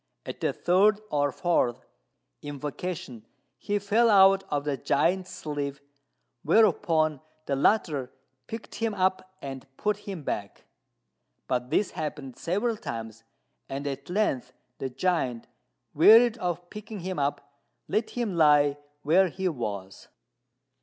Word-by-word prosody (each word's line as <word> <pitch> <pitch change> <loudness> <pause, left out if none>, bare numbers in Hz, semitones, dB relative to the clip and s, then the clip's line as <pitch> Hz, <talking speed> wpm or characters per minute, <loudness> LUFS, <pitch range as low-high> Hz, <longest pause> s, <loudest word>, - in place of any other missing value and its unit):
At - - -7
the - - +1
third 200 +4 +3
or 145 -1 +1
fourth 130 -6 0 0.6
invocation 145 -3 -6 0.4
he 205 - -1
fell 215 +4 +3
out 195 -1 +6
of 145 -1 -1
the 145 -1 -1
giant's 180 +8 +1
sleeve, 145 -5 -4 0.6
whereupon 165 -8 +3 0.2
the 140 - 0
latter 145 - +1 0.4
picked 225 0 -8
him 225 -2 -2
up 185 0 0
and 135 -1 -7
put 210 -1 0
him 195 -6 -7
back; 100 -6 -5 0.8
but 125 -1 -1
this 185 +6 +1
happened 150 -4 -5
several 210 +6 -1
times, 115 - -7 0.5
and 140 +1 -4
at 140 +1 -5
length 155 - 0 0.3
the 135 - -3
giant, 130 -6 -1 0.5
wearied 225 +9 +7
of 175 -1 -3
picking 210 -1 -8
him 185 -2 -4
up, 140 0 -3 0.3
let 220 +1 0
him 230 -6 -3
lie 145 -3 +4 0.2
where 180 +6 +4
he 190 +2 -3
was. 105 - -5
165 Hz, 125 wpm, -27 LUFS, 140-195 Hz, 0.8 s, wearied